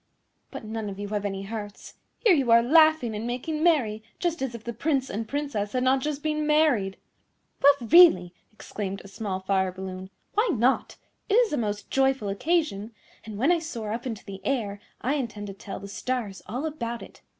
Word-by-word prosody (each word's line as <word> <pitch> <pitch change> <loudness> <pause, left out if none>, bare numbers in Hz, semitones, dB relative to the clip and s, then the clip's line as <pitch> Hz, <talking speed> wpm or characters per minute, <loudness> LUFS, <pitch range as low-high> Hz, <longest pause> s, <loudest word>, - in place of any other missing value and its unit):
But - - -8
none 220 -1 -4
of 195 - -7
you 205 0 -5
have 205 -1 -2
any 195 -1 -3
hearts. 205 0 -7 0.3
Here 430 - +7
you 275 -7 +1
are 230 0 +7
laughing 310 -3 +5
and 215 +2 -4
making 280 +6 -3
merry 260 -11 +2 0.2
just 340 -3 -1
as 260 -3 -2
if 230 - -9
the 235 - -5
Prince 270 +2 0
and 220 +3 -3
Princess 280 -7 -3
had 255 -1 +1
not 260 +1 +3
just 295 0 -3
been 305 -1 -1
married." 290 -11 +2 0.6
"Well, 285 +1 +8
really," 220 - +7 0.2
exclaimed 200 -2 -6
a - - -11
small 195 -2 -4
Fire 190 -1 +1
balloon, 185 0 -7 0.2
"why 430 +3 +2
not? 245 +3 +1 0.3
It 410 - +3
is 470 -7 +4
a - - +1
most 210 -3 -3
joyful 265 -5 +2
occasion, 225 - -1 0.3
and 215 -2 -7
when 270 +10 +3
I 350 - +3
soar 235 -10 -5
up 240 +3 -4
into 225 -4 -6
the 195 -1 -9
air 215 -7 -1 0.2
I 260 +5 0
intend 230 -7 -3
to 195 - -7
tell 195 0 -8
the 200 - -8
stars 210 -1 -3
all 250 +10 -3
about 235 -7 -4
it. - - -14
235 Hz, 200 wpm, -26 LUFS, 205-290 Hz, 0.6 s, Well